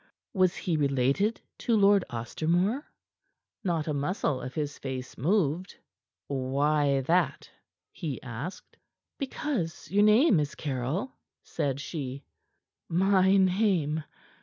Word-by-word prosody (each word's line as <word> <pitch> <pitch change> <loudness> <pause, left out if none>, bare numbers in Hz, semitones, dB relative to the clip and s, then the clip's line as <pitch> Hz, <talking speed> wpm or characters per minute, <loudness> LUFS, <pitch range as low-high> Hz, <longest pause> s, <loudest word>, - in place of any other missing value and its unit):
Was 185 -3 +3
he 170 -4 -1
related 140 - +1 0.2
to 230 -2 +2
Lord 200 -1 +5
Ostermore?" 170 - 0 0.8
Not 165 -4 -1
a 155 - 0
muscle 145 -1 -1
of 125 +1 -7
his 145 -2 -3
face 130 -2 -5
moved. 175 - 0 0.5
"Why 140 +1 +1
that?" 170 +7 0 0.4
he 155 -8 -5
asked. 125 - -7 0.4
"Because 260 - -3
your 205 +2 +4
name 215 - +5
is 145 -1 -2
Caryll," 140 - -2 0.3
said 140 -1 -2
she. 140 -2 -5 0.7
"My 190 +2 +4
name?" 185 -6 +2
160 Hz, 110 wpm, -28 LUFS, 140-195 Hz, 0.8 s, Lord